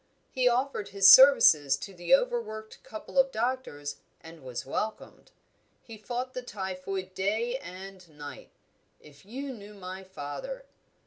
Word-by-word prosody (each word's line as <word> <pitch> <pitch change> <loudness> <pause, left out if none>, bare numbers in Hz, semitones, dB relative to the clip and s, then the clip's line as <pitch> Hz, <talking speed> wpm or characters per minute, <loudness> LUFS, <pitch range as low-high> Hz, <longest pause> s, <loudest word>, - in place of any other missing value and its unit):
He 255 -1 +1
offered 250 -3 0
his 195 -1 +4
services 165 - +8
to 195 +7 -9
the 175 +8 +4
overworked 275 - -4
couple 220 +5 -4
of 270 0 +4
doctors 225 - -3 0.2
and 165 0 -13
was 125 -2 -6
welcomed. 215 +11 -5 0.5
He 225 - -11
fought 245 +4 -5
the 255 - -4
typhoid 190 -3 -5
day 220 +7 -1
and 185 -4 -11
night 145 -3 -10 0.5
if 145 +3 -18
you 270 +4 -6
knew 210 -2 -12
my 190 0 -8
father! 190 - -7
200 Hz, 135 wpm, -28 LUFS, 180-250 Hz, 0.5 s, services